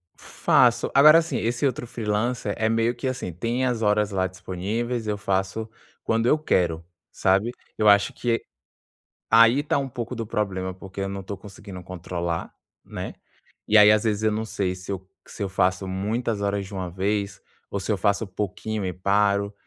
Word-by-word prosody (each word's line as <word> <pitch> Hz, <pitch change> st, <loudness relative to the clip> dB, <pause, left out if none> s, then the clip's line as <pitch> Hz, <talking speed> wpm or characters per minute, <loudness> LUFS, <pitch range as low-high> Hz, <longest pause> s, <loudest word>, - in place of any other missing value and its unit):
Faço. -, -, +2 dB
Agora, 155 Hz, +3 st, +8 dB
assim, 160 Hz, -7 st, -2 dB
esse 120 Hz, +4 st, -1 dB
outro 120 Hz, -2 st, -1 dB
freelancer 110 Hz, -1 st, -1 dB
é 110 Hz, 0 st, +1 dB
meio 115 Hz, +1 st, +2 dB
que 120 Hz, +2 st, -4 dB
assim: 130 Hz, -8 st, -3 dB
tem 120 Hz, +8 st, -1 dB
as 120 Hz, -3 st, -1 dB
horas 105 Hz, -1 st, +2 dB
lá 95 Hz, -1 st, +1 dB
disponíveis, 105 Hz, +6 st, -3 dB
eu 105 Hz, -1 st, -1 dB
faço 100 Hz, +3 st, -2 dB, 0.3 s
quando 115 Hz, +1 st, +1 dB
eu 150 Hz, -, +4 dB
quero, 85 Hz, -, 0 dB, 0.3 s
sabe? 95 Hz, +5 st, +2 dB, 0.3 s
Eu 110 Hz, -, +2 dB
acho 100 Hz, 0 st, +4 dB
que 115 Hz, -1 st, -1 dB, 0.9 s
aí 115 Hz, +5 st, +6 dB
tá 145 Hz, -, 0 dB
um 135 Hz, -, -2 dB
pouco 120 Hz, -1 st, -5 dB
do 115 Hz, -1 st, -4 dB
problema, 95 Hz, -4 st, -2 dB
porque 95 Hz, +1 st, -9 dB
eu 95 Hz, -, -1 dB
não 100 Hz, 0 st, -5 dB
tô 100 Hz, +1 st, -6 dB
conseguindo 95 Hz, -1 st, -10 dB
controlar, 85 Hz, -1 st, -4 dB, 0.3 s
né? -, -, -6 dB, 0.5 s
E, 110 Hz, -, +5 dB
aí, 105 Hz, 0 st, +9 dB
às 110 Hz, 0 st, +3 dB
vezes, 110 Hz, -1 st, 0 dB
eu 110 Hz, -, +3 dB
não 110 Hz, +1 st, -2 dB
sei 95 Hz, -4 st, -2 dB
se 95 Hz, +2 st, -8 dB
eu 95 Hz, -1 st, -5 dB, 0.2 s
se -, -, -11 dB
eu 100 Hz, -, 0 dB
faço 95 Hz, 0 st, 0 dB
muitas 105 Hz, +3 st, -2 dB
horas 100 Hz, -1 st, -1 dB
de 100 Hz, -, -11 dB
uma 95 Hz, -2 st, -3 dB
vez, 100 Hz, +2 st, -2 dB, 0.3 s
ou 100 Hz, -, -2 dB
se 95 Hz, -, -7 dB
eu 100 Hz, -, +1 dB
faço 100 Hz, +2 st, +1 dB
pouquinho 105 Hz, +2 st, -3 dB
e 90 Hz, -, -1 dB
paro. 100 Hz, +2 st, +1 dB
105 Hz, 185 wpm, -24 LUFS, 95-115 Hz, 0.9 s, aí